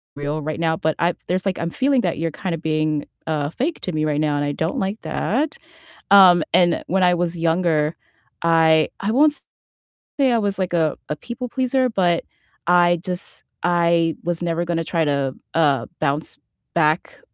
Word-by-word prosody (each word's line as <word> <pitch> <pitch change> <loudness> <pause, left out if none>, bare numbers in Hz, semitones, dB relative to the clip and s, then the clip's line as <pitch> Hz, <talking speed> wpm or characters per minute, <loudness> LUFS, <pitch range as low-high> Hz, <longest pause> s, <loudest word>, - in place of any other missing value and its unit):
real 145 +2 -3
right 155 +2 -4
now, 160 -1 +1
but 160 0 -1
I 170 +1 +2
there's 185 +2 -1
like, 190 - -1
I'm 170 - -2
feeling 265 +6 +1
that - - -1
you're 165 0 -2
kinda 170 0 -4
being, 155 -2 -1 0.2
uh, 150 -2 -1
fake 285 - -3
to 185 - -3
me 155 -2 -1
right 150 -1 0
now, 150 -1 +1
and 145 - 0
I 145 - -1
don't 160 +3 -2
like 195 +3 -3
that. 290 +8 -1 0.5
Um, 185 -4 +8
and 175 -1 +3
when 190 +1 +1
I 180 -1 +4
was 175 0 -1
younger 165 -2 +1 0.5
I 160 -1 +4
I 205 - -1
won't 295 +3 +3 0.8
say 265 -3 +4
I 235 - +3
was 200 -2 -1
like 180 -1 -2
a 160 -3 +1
a 150 - -1
people 245 +8 -7
pleaser, 260 0 +1
but 175 -6 +1 0.4
I 175 -1 +4
just 180 -1 -2 0.2
I 170 -2 +2
was 175 0 -2
never 170 0 -1
gonna 165 -1 -1
try 165 0 0
to, 140 -2 0 0.2
uh, 145 -6 +2
bounce 150 0 -2 0.4
back 155 0 +1
170 Hz, 185 wpm, -21 LUFS, 155-185 Hz, 0.8 s, Um